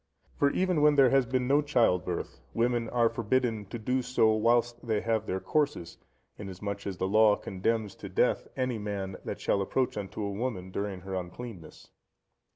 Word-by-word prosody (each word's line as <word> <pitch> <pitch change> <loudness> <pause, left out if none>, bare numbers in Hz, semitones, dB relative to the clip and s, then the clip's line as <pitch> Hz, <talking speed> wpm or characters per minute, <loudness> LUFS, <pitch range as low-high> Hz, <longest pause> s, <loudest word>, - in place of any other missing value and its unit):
For 140 - +3
even 180 0 +1
when 150 0 +5
there 135 -3 +6
has 135 -2 +3
been 130 0 0
no 140 +3 +4
child 120 -11 +2
birth, 85 -8 -4
women 120 0 +1
are 120 -1 +3
forbidden 115 -1 0
to 110 - -6
do 125 +4 0
so, 125 -3 +3
whilst 120 +2 +1
they 110 -2 +1
have 110 -1 -1
their 95 - -1
courses, 145 - -1 0.4
insomuch 100 0 -5
that 95 -2 -4
the 95 - -1
Law 105 +1 +5
condemns 105 +2 -2
to 100 - -8
death 95 - +1
any 130 -3 -1
man 100 -2 -4
that - - -4
shall 100 - +1
approach 125 +6 -1
unto 105 +1 -4
a 100 - -2
woman 100 -4 -4
during 100 -1 -3
her 95 +1 -7
uncleanness. 90 0 -7
110 Hz, 180 wpm, -29 LUFS, 100-125 Hz, 0.4 s, there